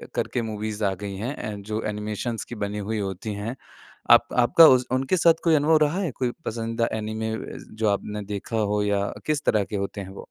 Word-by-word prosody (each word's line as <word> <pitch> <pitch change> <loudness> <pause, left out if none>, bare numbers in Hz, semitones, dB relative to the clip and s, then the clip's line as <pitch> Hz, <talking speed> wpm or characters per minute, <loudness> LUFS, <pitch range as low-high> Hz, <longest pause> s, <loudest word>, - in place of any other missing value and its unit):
करके 125 - -1
मूवीज़ 105 0 -4
आ 95 - +1
गई 100 -1 -4
हैं, 110 -3 -4
जो 110 +2 -3
एनिमेशन्स 105 +2 -3
की 120 - -8
बनी 105 +1 -4
हुई 110 - -1
होती 100 +2 -4
हैं। 105 +5 -4 0.6
आप - - +7
आपका 155 +7 +8
उस 125 0 0
उनके 130 +8 +1
साथ 165 -1 +6
कोई 165 -2 +4
अनुभव 155 +2 +4
रहा 165 +6 -1
है? 170 -7 -1
कोई 125 0 -2
पसंदीदा 115 +1 -1
ऐनिमे 110 +1 -3
अ, - - -7
जो 110 -1 0
आपने 105 +1 -2
देखा 110 +3 -3
हो 105 -1 +1
या 100 -1 +1 0.2
किस 150 -1 0
तरह 105 - +3
के - - -6
होते 100 +1 -3
हैं 95 - -8
वो? 95 - -10
110 Hz, 210 wpm, -25 LUFS, 105-125 Hz, 0.6 s, आपका